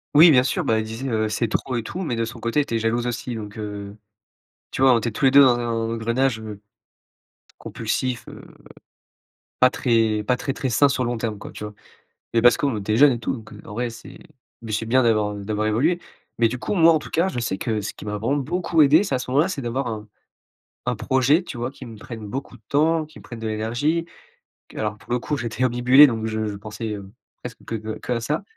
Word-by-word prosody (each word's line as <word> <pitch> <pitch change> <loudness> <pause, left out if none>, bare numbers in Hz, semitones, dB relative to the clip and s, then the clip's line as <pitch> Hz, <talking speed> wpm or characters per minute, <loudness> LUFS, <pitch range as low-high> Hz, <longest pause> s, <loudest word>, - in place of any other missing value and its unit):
Oui 160 +3 +9
bien 125 -3 +5
sûr, 180 +6 -1
bah, 115 -6 +2
elle 110 - -3
disait, 115 +5 -5
heu, 110 -2 0
c'est 110 +1 -1
trop 125 +3 -2
et 115 - -1
tout, 180 +11 -5
mais 135 -8 -2
de 115 - -1
son 115 +1 -6
côté 115 +6 +1
était 115 -5 -2
jalouse 115 +2 0
aussi 120 0 -3
donc, 105 -1 -7
heu, 105 -1 -6 0.7
tu - - -4
vois 135 -1 +7
on - - +4
était 115 0 -2
tous 110 - -1
les - - +7
2 140 +1 +8
dans 125 -2 +4
un 120 - -2 0.3
engrenage, 115 +2 0
heu, 105 -2 -8 1.0
compulsif, 130 -2 -3
heu, - - -10 1.2
pas 130 - +6
très 115 -4 +1
pas 125 +4 +1
très 135 +2 -3
très 135 - -3
sain 140 +4 +4
sur 130 -1 -1
le 120 - -1
long 120 - -2
terme 110 -2 -3
quoi - - -9
tu - - -8
vois? 105 0 -7 0.6
Mais 115 - +3
parce 120 +1 +6
qu'on 140 -5 0
était 105 +2 -1
jeunes 145 +2 +7
et 120 - -2
tout - - -2
donc, 110 -4 -9
heu, - - -12
en 105 - -9
vrai 120 +2 -2
c'est, 115 - -12 0.5
beh, 115 - -6
c'est 115 +2 -2
bien 130 +3 +4
d'avoir, 110 -3 +2
heu, 100 - -7
d'avoir 110 0 -1
évolué. 145 +12 +1 0.4
Mais 115 - +5
du 120 +3 -4
coup 125 - -3
moi 165 -3 +6
en - - +4
tout - - -11
cas 170 +4 +2
je 190 - -4
sais 115 -6 -2
que 110 -3 -1
ce 100 - -5
qui - - -11
m'a 105 0 -3
vraiment 115 +7 0
beaucoup 165 +3 +1
aidé 150 +5 +6
c'est- 190 - -3
à 130 - +1
ce 125 - -6
moment-là- 140 +5 +3
c'est 165 -7 -4
d'avoir 125 +3 -2
un 110 -3 -5 0.8
un - - 0
projet 130 +6 +2
tu 150 - -8
vois 120 +1 -2
qui 135 -1 -11
me 115 -2 -10
prenne 110 0 -8
beaucoup 135 +5 -6
de - - -18
temps, 160 +3 +2
qui 155 - -15
me - - -16
prenne 115 - -9
de 115 - -4
l'énergie. 120 +10 -1 0.7
Alors 105 -1 -3
pour - - -9
le 125 - +1
coup 145 +5 -2
j'étais 120 -1 -2
obnubilé 125 +4 +6
donc 110 -3 -2
je 110 0 -2
je 100 - -5
pensais, 105 +2 -6
heu, 100 -2 -8 0.3
presque 125 -1 -9
que 115 - -4
que 110 0 -5
qu'à 120 -1 -2
ça. 150 +7 -2
120 Hz, 250 wpm, -23 LUFS, 110-135 Hz, 1.2 s, Oui